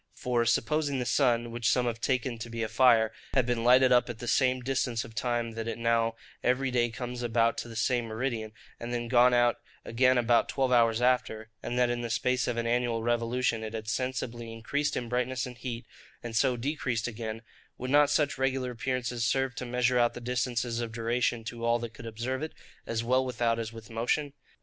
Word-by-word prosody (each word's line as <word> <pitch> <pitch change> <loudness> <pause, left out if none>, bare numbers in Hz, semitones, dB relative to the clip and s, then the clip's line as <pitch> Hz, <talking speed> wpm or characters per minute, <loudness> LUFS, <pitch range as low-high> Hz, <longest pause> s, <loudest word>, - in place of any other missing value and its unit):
For, 120 -2 0
supposing 140 +5 +1
the 125 - -2
sun, 120 -3 +2
which 115 -1 0
some 125 -1 +2
have 115 -1 -2
taken 125 -1 -1
to 115 - -6
be 115 0 -3
a - - -1
fire, 115 -1 +4 0.2
had 130 -3 +4
been 120 -2 -1
lighted 130 +2 +6
up 125 0 +4
at 120 - -5
the 120 - -7
same 130 +1 +2
distance 125 -3 -1
of 110 - -12
time 120 0 -1
that 115 0 -5
it 115 - -3
now 115 -1 +1 0.3
every 130 +1 +1
day 120 -1 +2
comes 125 +1 -6
about 115 -1 +2
to - - -5
the 115 - -9
same 120 +1 +1
meridian, 110 -1 -3 0.3
and 120 +1 -5
then 120 -1 -2
gone 125 +1 +5
out 120 -1 +3 0.3
again 125 +2 +3
about 120 -1 +3
twelve 130 -1 0
hours 115 -1 +3
after, 110 -3 +1
and 120 - -3
that 125 -1 +3
in 120 0 -2
the 120 - -4
space 125 +2 0
of 120 - -1
an 115 - -1
annual 120 -1 0
revolution 120 0 0
it 110 +1 -5
had 110 -1 -6
sensibly 120 0 -3
increased 140 +6 -2
in 120 - -3
brightness 125 +1 -1
and 125 -2 -9
heat, 120 -2 -5 0.4
and 120 -1 -6
so 125 +1 +2
decreased 125 -3 -2
again,—would 115 +2 -7
not 145 0 +5
such 145 -2 +1
regular 130 -1 0
appearances 125 -1 -2
serve 135 +2 +1
to 125 0 -6
measure 125 0 +2
out 120 -1 +2
the - - -5
distances 120 -1 -1
of 115 -1 -4
duration 115 0 0
to 115 +1 -7
all 115 0 +3
that 120 -1 -6
could 115 - -9
observe 120 +4 -3
it, 155 - -5 0.3
as 115 0 -1
well 130 +2 +2
without 120 -2 0
as 110 -1 -4
with 115 -1 -11
motion? 130 +6 -1
120 Hz, 210 wpm, -29 LUFS, 115-125 Hz, 0.4 s, lighted